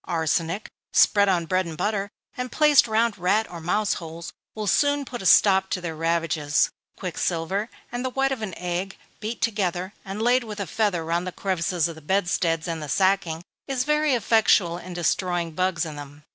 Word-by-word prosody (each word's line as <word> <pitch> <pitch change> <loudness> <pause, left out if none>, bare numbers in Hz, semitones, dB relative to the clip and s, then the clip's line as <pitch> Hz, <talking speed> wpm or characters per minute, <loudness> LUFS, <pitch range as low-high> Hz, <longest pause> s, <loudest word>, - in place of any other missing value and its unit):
Arsenic, 165 +3 -1 0.2
spread 200 -1 +5
on 175 -3 +1
bread 185 +1 0
and 160 -2 -7
butter, 205 +1 -1 0.3
and 250 0 -4
placed 300 -4 +5
round 220 -1 +1
rat 200 +5 +2
or 170 -2 -7
mouse 205 +5 +1
holes, 165 +1 -8 0.2
will 215 -1 -3
soon 285 +7 +2
put 245 -3 -7
a 190 - 0
stop 190 0 +5
to - - -1
their 170 -3 -5
ravages. 160 -2 +1 0.3
Quicksilver 185 +3 -2 0.2
and 245 +1 -3
the 260 - -1
white 270 +1 0
of 260 -4 -3
an 195 -5 -5
egg, 180 +2 -3 0.2
beat 220 +2 -4
together, 190 -4 -1
and 195 +1 -6
laid 245 +3 +3
with 215 -2 -7
a 200 - -2
feather 185 -2 0
round 170 +2 -1
the - - -3
crevices 180 -3 -1
of 165 - -6
the 160 - -13
bedsteads 175 -1 0
and 165 -2 -3
the 150 - -6
sacking, 185 -3 +1 0.2
is 265 -2 0
very 300 -1 +2
effectual 205 -6 +3
in 180 +1 -9
destroying 175 0 0
bugs 175 0 0
in 155 -2 -7
them. 145 +1 -10
185 Hz, 190 wpm, -24 LUFS, 170-215 Hz, 0.3 s, spread